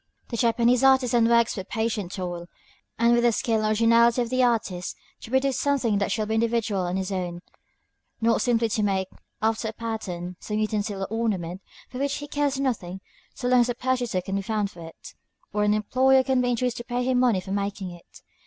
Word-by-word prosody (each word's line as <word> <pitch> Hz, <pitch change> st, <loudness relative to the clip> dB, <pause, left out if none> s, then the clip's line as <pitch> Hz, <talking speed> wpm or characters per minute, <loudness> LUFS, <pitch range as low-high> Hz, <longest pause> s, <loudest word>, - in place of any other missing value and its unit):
The 235 Hz, -, -4 dB
Japanese 235 Hz, +2 st, +3 dB
artisan 250 Hz, -3 st, +4 dB
works 235 Hz, 0 st, +3 dB
with 190 Hz, -2 st, -7 dB
patient 220 Hz, -5 st, -2 dB
toil, 175 Hz, -2 st, -5 dB, 0.5 s
and 235 Hz, +1 st, +4 dB
with 240 Hz, -, +4 dB
the 240 Hz, 0 st, +4 dB
skill 225 Hz, 0 st, 0 dB
and 215 Hz, -, 0 dB
originality 230 Hz, +2 st, +4 dB
of 235 Hz, -, -7 dB
the 255 Hz, 0 st, +2 dB
artist, 220 Hz, -7 st, 0 dB, 0.2 s
to -, -, -11 dB
produce 265 Hz, +1 st, +1 dB
something 255 Hz, -8 st, +1 dB
that 200 Hz, -, -1 dB
shall 215 Hz, +1 st, 0 dB
be 220 Hz, -, -2 dB
individual 225 Hz, -4 st, 0 dB
and 180 Hz, +2 st, -2 dB
his 190 Hz, +1 st, -3 dB
own; 175 Hz, -2 st, -4 dB, 0.8 s
not 230 Hz, 0 st, +2 dB
simply 235 Hz, -2 st, +2 dB
to 215 Hz, -, 0 dB
make, 190 Hz, -2 st, 0 dB, 0.3 s
after 220 Hz, 0 st, +1 dB
a 220 Hz, -, -4 dB
pattern, 185 Hz, -6 st, -5 dB
some 210 Hz, -, -4 dB
utensil 210 Hz, -2 st, -1 dB
or -, -, -3 dB
ornament 195 Hz, -6 st, -2 dB, 0.3 s
for 255 Hz, -, -8 dB
which 280 Hz, 0 st, 0 dB
he 290 Hz, -, -6 dB
cares 285 Hz, -2 st, -1 dB
nothing, 200 Hz, -9 st, -2 dB, 0.4 s
so 245 Hz, -, -3 dB
long 250 Hz, 0 st, +5 dB
as 240 Hz, 0 st, +3 dB
a 245 Hz, -, -1 dB
purchaser 245 Hz, -7 st, -1 dB
can 195 Hz, +2 st, -4 dB
be -, -, -1 dB
found 205 Hz, 0 st, -2 dB
for 170 Hz, -, -13 dB
it, 165 Hz, -, -13 dB, 0.4 s
or 210 Hz, 0 st, +1 dB
an 210 Hz, 0 st, +3 dB
employer 260 Hz, +5 st, +3 dB
can 260 Hz, -1 st, +1 dB
be 245 Hz, -, +1 dB
induced 245 Hz, 0 st, 0 dB
to 240 Hz, -, -5 dB
pay 245 Hz, 0 st, -2 dB
him 255 Hz, 0 st, +1 dB
money 240 Hz, -6 st, +3 dB
for 190 Hz, +1 st, -8 dB
making 200 Hz, -2 st, -3 dB
it. 175 Hz, -1 st, -15 dB
225 Hz, 210 wpm, -25 LUFS, 200-245 Hz, 0.8 s, long